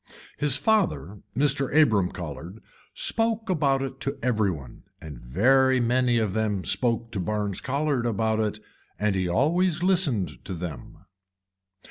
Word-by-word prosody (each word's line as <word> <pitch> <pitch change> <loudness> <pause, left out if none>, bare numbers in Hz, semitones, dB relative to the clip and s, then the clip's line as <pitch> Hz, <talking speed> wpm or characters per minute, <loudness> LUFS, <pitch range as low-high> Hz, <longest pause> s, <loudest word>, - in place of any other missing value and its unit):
His 145 -3 +2
father 105 - 0 0.2
Mr. 140 -1 +1
Abram 105 -11 +4
Colhard 85 +4 -8 0.3
spoke 225 -2 0
about 140 -5 +1
it 135 0 -6
to 140 +1 -3
every 110 -5 +2
one 70 -8 -7 0.2
and 75 -5 -9
very 130 - +3
many 120 0 +2
of 110 -4 0
them 105 -3 -1
spoke 115 -2 0
to 100 - -4
Barnes 100 +1 -2
Colhard 140 -2 -1
about 110 0 0
it 105 -1 -1 0.4
and 105 -1 +1
he 95 -2 -1
always 170 - +1
listened 145 - 0
to 95 - -6
them. 80 -7 -8
115 Hz, 140 wpm, -25 LUFS, 95-140 Hz, 0.4 s, Abram